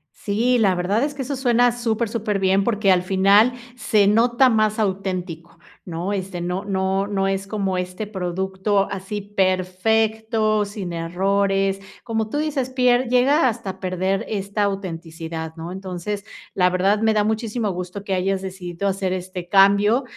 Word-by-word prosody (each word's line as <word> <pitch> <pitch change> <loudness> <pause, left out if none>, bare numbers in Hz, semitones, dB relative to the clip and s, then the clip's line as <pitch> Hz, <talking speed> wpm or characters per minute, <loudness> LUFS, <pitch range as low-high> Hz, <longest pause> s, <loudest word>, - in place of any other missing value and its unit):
Sí, 230 +5 +1
la 200 -5 +3
verdad, 195 +7 0
es 290 0 -1
que 280 - -6
eso 275 +2 -3
suena 245 -2 +3
súper, 235 -1 -1
súper 215 -3 -2
bien. 190 +1 +2
Porque 210 -2 +2
al 180 -1 +3
final, 195 +5 +4 0.2
se 215 -5 +2
nota 240 +4 +4
más 215 -2 +2
auténtico, 185 -5 -3 0.3
¿no? 175 +2 -4
Este, 185 -2 -4
no 180 +3 -3
no 190 0 0
no 195 -1 0
es 195 0 -2
como 195 -3 -2
este 180 +3 -4
producto, 190 +1 -1
así 200 +2 -4
perfecto, 215 +3 +1
sin 200 -3 -6
errores. 195 +3 0 0.2
Como 225 -2 -2
tú 290 - -3
dices, 290 -4 -1
pier 250 -1 +2
llega 260 +4 +4
hasta 225 -5 -4
perder 185 +1 -1
esta 200 0 -2
autenticidad, 165 -4 -4
¿no? 165 +1 -7
Entonces, 190 +2 -5 0.3
la 180 -1 +3
verdad, 195 +3 +2
me 220 0 +2
da 210 -1 +2
muchísimo 220 +1 -1
gusto 180 +2 -6
que 195 - -3
hayas 190 +1 0
decidido 185 0 -5
hacer 190 -1 -1
este 185 -1 -6
cambio. 200 +6 +4
195 Hz, 160 wpm, -22 LUFS, 185-220 Hz, 0.3 s, final